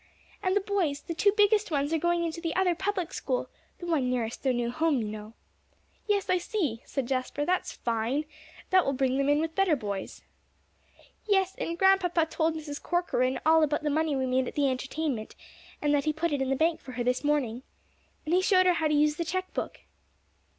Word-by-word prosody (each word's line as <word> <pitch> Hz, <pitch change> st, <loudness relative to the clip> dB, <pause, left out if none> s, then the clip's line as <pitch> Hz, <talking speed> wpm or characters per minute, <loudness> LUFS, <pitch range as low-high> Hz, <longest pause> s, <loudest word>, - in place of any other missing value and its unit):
"And 375 Hz, -1 st, +1 dB
the 410 Hz, -, +3 dB
boys 370 Hz, -8 st, -1 dB
the 335 Hz, -, -5 dB
two 400 Hz, +5 st, +3 dB
biggest 415 Hz, 0 st, +4 dB
ones 290 Hz, 0 st, 0 dB
are 325 Hz, -, +2 dB
going 345 Hz, +1 st, +1 dB
into 335 Hz, 0 st, -4 dB
the 330 Hz, -1 st, -2 dB
other 370 Hz, -1 st, +3 dB
public 380 Hz, -1 st, -2 dB
school, -, -, -2 dB, 0.3 s
the 350 Hz, -, -8 dB
one 305 Hz, -7 st, +1 dB
nearest 240 Hz, -2 st, -2 dB
their 265 Hz, -, +2 dB
new 240 Hz, -1 st, -1 dB
home, 315 Hz, +1 st, +1 dB
you 225 Hz, -3 st, -2 dB
know." 215 Hz, +1 st, -8 dB, 0.7 s
"Yes, 405 Hz, -2 st, +1 dB
I 365 Hz, -, +2 dB
see," 320 Hz, -, -2 dB
said 270 Hz, -4 st, -3 dB
Jasper, 265 Hz, +3 st, -2 dB
"that's 365 Hz, +2 st, 0 dB
fine. 235 Hz, +6 st, -1 dB, 0.5 s
That 370 Hz, -1 st, +6 dB
will 275 Hz, -, 0 dB
bring 265 Hz, 0 st, +1 dB
them 275 Hz, 0 st, +1 dB
in 290 Hz, +1 st, +4 dB
with 320 Hz, 0 st, -2 dB
better 375 Hz, -3 st, +3 dB
boys." 200 Hz, -6 st, -5 dB, 1.0 s
"Yes, 385 Hz, -2 st, +2 dB
and 335 Hz, 0 st, -3 dB
Grandpapa 365 Hz, -3 st, +3 dB
told 320 Hz, 0 st, 0 dB
Mrs. 295 Hz, -2 st, -6 dB
Corcoran 265 Hz, -8 st, 0 dB
all 320 Hz, 0 st, +6 dB
about 300 Hz, 0 st, +1 dB
the 300 Hz, -, 0 dB
money 310 Hz, 0 st, +1 dB
we 265 Hz, -1 st, 0 dB
made 255 Hz, 0 st, +1 dB
at -, -, -7 dB
the 280 Hz, -2 st, +2 dB
entertainment, 265 Hz, -2 st, -3 dB, 0.5 s
and 295 Hz, 0 st, +2 dB
that 285 Hz, -1 st, +1 dB
he 305 Hz, -, +1 dB
put 320 Hz, 0 st, -1 dB
it 280 Hz, -, 0 dB
in 265 Hz, -, 0 dB
the 270 Hz, -, +2 dB
bank 320 Hz, +3 st, +1 dB
for 255 Hz, -, -10 dB
her 240 Hz, 0 st, -2 dB
this 250 Hz, +3 st, 0 dB
morning. 270 Hz, -5 st, 0 dB, 0.6 s
And 310 Hz, -, -1 dB
he 365 Hz, -, +4 dB
showed 370 Hz, -1 st, +4 dB
her 365 Hz, -, +5 dB
how 320 Hz, -2 st, +1 dB
to 300 Hz, -, +1 dB
use 300 Hz, +1 st, +3 dB
the 340 Hz, -, -1 dB
check 370 Hz, +3 st, -3 dB
book." -, -, -4 dB
310 Hz, 215 wpm, -28 LUFS, 265-350 Hz, 1.0 s, That